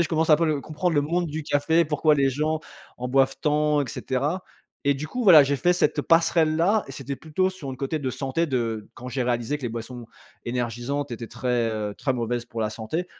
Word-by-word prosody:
est, - - +4
je - - -4
commence 160 0 +1
à 155 - +8
peu 165 +2 +1
le 150 -2 0
comprendre 155 +4 -2
le 145 - +4
monde 170 +4 0
du 155 0 -4
café, 155 +3 +2
pourquoi 150 0 +3
les 135 -1 +3
gens 155 +3 -1 0.4
en 125 +1 -3
boivent 135 +1 +3
tant, 150 0 +2
et 135 - -6
cetera. 145 +8 -2 0.4
Et 140 - +4
du 145 +3 -5
coup, 250 +7 -3
voilà, 170 -7 +9
j'ai 140 +1 0
fait 175 +7 +3
cette, 180 - +1
heu, - - +2
passerelle 165 -1 +3
là 200 +6 +2
et - - -7
c'était 135 +1 -5
plutôt 175 +6 -1
sur 180 -8 -8
un 130 - -6
côté 140 +4 -2
de 135 -3 -2
santé 135 +6 -1
de 115 -6 -2
quand 125 - -8
j'ai 125 +1 -2
réalisé 120 +3 -1
que - - -16
les 120 - -1
boissons 115 +1 -7 0.4
énergisantes 120 +4 -3
étaient 115 0 -5
très, 120 -1 -1
heu, 105 -1 -3
très 135 - 0
mauvaises 120 -1 -2
pour 115 -1 -6
la 105 -1 0
santé 115 +12 -4
140 Hz, 240 wpm, -25 LUFS, 125-155 Hz, 0.4 s, voilà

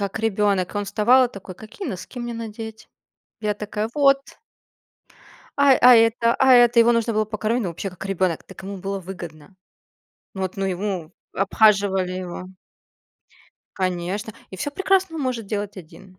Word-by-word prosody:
как 200 +1 -3
ребенок. 205 -4 0
И - - -1
он 205 - -2
вставал 245 +6 +4
и 245 - -15
такой: 190 -2 -10
"Какие 220 - -9
носки 195 +6 -7
мне 240 -1 -4
надеть?" 220 -1 -8 0.5
Я 210 -1 -1
такая: 210 +1 -4
"Вот." 275 -2 +4 1.4
А 280 -2 +6
а 250 0 +9
это, 230 +1 +3
а 265 0 +5
это, 240 -1 +5
его 235 +1 +6
нужно 230 0 0
было 215 0 +1
покормить, 215 +3 -2
ну 185 - -2
вообще, 175 +4 -5
как 185 +1 -10
ребенок, 185 -3 -1
так - - -13
ему 200 +1 -6
было 195 +1 -4
выгодно. 175 -2 -10 0.8
Вот 190 -1 -4
ну 195 - -2
ему, 185 -3 -3 0.2
обхаживали 195 -2 +2
его. 180 -1 -6 1.3
Конечно, 185 +3 -2 0.2
и 190 - -8
всё 290 - -3
прекрасно 380 -1 +1
он 295 - -3
может 240 -5 -3
делать 205 -1 -4
один, 185 +2 -14
210 Hz, 165 wpm, -22 LUFS, 190-230 Hz, 1.4 s, а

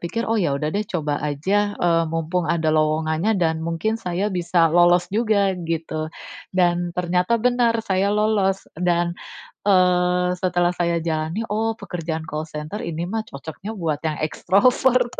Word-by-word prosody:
pikir, 230 +7 -3
“Oh 225 - +2
ya 145 -7 +1
sudah 150 +2 -2
deh, 210 +1 -1
coba 150 -4 -1
aja, 195 +8 0
eee, 165 -1 +2
mumpung 165 +2 -1
ada 165 -2 +1
lowongannya 155 +6 +1
dan 160 -1 +1
mungkin 170 +7 -1
saya 180 +1 -1
bisa 170 -2 +2
lolos 175 0 +5
juga,” 210 -3 +2
gitu. 160 -1 -3 0.4
Dan 175 -1 +1
ternyata 180 +5 +1
benar, 240 -1 +2
saya 195 +1 +1
lolos, 205 -2 +1
dan, 175 -1 +1 0.6
eee, 180 -1 +3
setelah 175 -1 +1
saya 170 -1 +1
jalani, 160 +6 -2
"Oh, 225 +1 0
pekerjaan 165 -6 -5
call 155 +1 -4
center 155 +8 -6
ini 165 0 -3
mah 220 +2 -1
cocoknya 160 +9 -8
buat 160 -6 -2
yang 155 - -1
ekstrovert," 245 +8 +2
175 Hz, 150 wpm, -22 LUFS, 160-205 Hz, 0.6 s, lolos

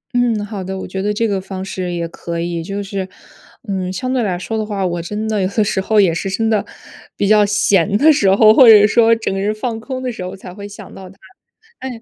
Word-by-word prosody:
嗯， 235 -4 +1
好 205 -2 -6
的， 190 +1 -5
我 - - -6
觉 190 +1 -5
得 210 +2 -1
这 225 +2 0
个 200 -2 -2
方 190 0 -7
式 185 -2 -4
也 170 -1 -3
可 170 0 -6
以。 170 0 -3
就 200 +4 -5
是， 195 -1 -4 0.6
嗯， 190 -2 -3
相 255 +8 -3
对 255 - +1
来 185 -5 -1
说 220 +4 -4
的 - - -1
话， 200 -3 -3
我 175 -1 -2
真 210 +6 -4
的 215 -2 -1
有 185 - +1
的 215 +2 0
时 200 -2 -1
候 210 +2 +2
也 185 -5 +4
是 170 +4 -3
真 220 +4 -1
的 215 - +1 0.5
比 200 - 0
较 210 0 +5
闲 205 -1 +2
的 310 +5 +5
时 200 -9 +2
候， 215 +2 +6
或 245 +1 +7
者 210 -2 +8
说 230 +1 +4
整 225 - -3
个 195 - -3
人 205 +2 0
放 225 +1 -4
空 255 +2 -6
的 250 - -2
时 185 - -7
候 185 +1 -6
才 185 -2 -11
会 200 +1 -9
想 205 - -12
到 190 -1 -11
他， 195 - -17 0.6
哎。 250 -3 -7
205 Hz, 280 characters per minute, -17 LUFS, 190-220 Hz, 0.6 s, 者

